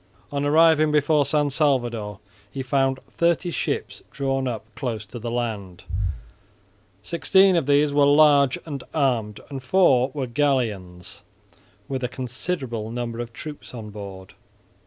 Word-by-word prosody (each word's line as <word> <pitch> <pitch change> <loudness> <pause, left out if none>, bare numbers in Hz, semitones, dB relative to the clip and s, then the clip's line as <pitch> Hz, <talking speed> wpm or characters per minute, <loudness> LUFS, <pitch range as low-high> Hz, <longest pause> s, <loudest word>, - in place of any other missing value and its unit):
On 140 0 -1
arriving 155 +1 +5
before 150 -1 +3
San 145 -2 +1
Salvador 120 -9 0 0.3
he 135 +4 -5
found 135 0 +1
thirty 170 +1 +1
ships - - -3
drawn 135 -1 -1
up 115 -4 -4
close 115 -5 -4
to 120 +4 -9
the 115 +1 -4
land; 105 -6 -4 1.2
sixteen 190 - +4
of 165 -5 +1
these 145 0 +3
were 145 -1 +5
large 145 -2 +5
and 140 -5 -6
armed, 120 -8 0
and 135 -1 -5
four 130 -4 +4
were 140 -3 -1
galleons 115 -10 -1 0.7
with 130 -1 -3
a - - +1
considerable 125 -2 -4
number 120 0 -4
of 120 -1 -5
troops 145 +1 -9
on 110 -3 -7
board. 95 -2 -9
130 Hz, 135 wpm, -24 LUFS, 115-145 Hz, 1.2 s, arriving